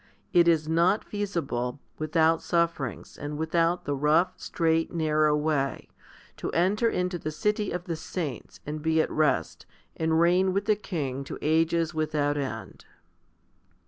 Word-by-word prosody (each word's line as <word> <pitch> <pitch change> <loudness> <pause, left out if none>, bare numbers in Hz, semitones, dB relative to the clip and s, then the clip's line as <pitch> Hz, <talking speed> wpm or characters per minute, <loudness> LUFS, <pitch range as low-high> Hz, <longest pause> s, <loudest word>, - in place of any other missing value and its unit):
It 175 -2 +5
is 160 -2 +3
not 170 +6 +3
feasible, 145 - -3 0.2
without 160 +1 +2
sufferings, 165 - -1
and 145 0 -5
without 165 +2 +1
the 145 - -1
rough, 155 +6 +3
straight, 165 -1 0
narrow 155 -2 +2
way, 150 -3 -1 0.5
to - - -4
enter 205 +7 +2
into 180 -2 -1
the 155 - -3
city 210 +6 -1
of 175 0 -3
the 170 -2 -3
saints, 155 - -6
and 150 +1 -4
be 160 +1 +2
at - - +1
rest, 155 -1 0 0.3
and 160 0 +1
reign 180 +2 +3
with 200 +1 0
the 215 0 +3
King 140 -10 -4
to - - -6
ages 165 +1 +2
without 150 -2 0
end. 140 -2 -5
160 Hz, 145 wpm, -27 LUFS, 150-175 Hz, 0.5 s, It